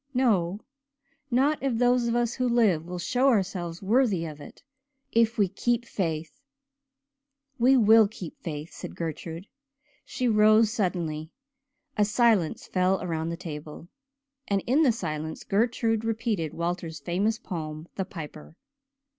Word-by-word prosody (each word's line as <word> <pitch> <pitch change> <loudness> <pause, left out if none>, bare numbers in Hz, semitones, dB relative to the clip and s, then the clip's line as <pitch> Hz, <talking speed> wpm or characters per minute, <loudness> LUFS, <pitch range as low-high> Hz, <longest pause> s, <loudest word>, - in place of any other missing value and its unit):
"No 205 -7 +2 0.7
not 275 +5 +2
if 270 -3 0
those 245 0 +3
of 235 - 0
us 240 -1 +1
who 255 -2 0
live 205 -9 +2
will 180 0 -5
show 250 +9 +1
ourselves 185 -7 0
worthy 210 -5 +2
of 150 -2 -8
it - - -13 0.5
if 230 0 +2
we 205 -2 +3
'keep 240 +5 -1
faith.'" 165 - -3 1.2
"We 260 +3 +5
will 220 -1 +6
keep 195 -6 -10
faith," 155 -1 -6
said - - -8
Gertrude. 165 +2 -5 0.6
She 255 - -2
rose 215 0 +5
suddenly. 170 -7 -2 0.7
A 210 - +4
silence 215 -6 +2
fell 185 +1 +1
around 165 -2 -2
the 170 - -4
table, 155 -1 -8 0.6
and 200 -1 0
in 270 +6 +3
the 280 -6 +5
silence 160 -7 -4
Gertrude 225 +1 +1
repeated 225 -8 -2
Walter's 170 -2 -3
famous 195 +9 0
poem 155 -5 -6
"The 190 - -3
Piper." 155 -3 -9
195 Hz, 140 wpm, -27 LUFS, 165-230 Hz, 1.2 s, will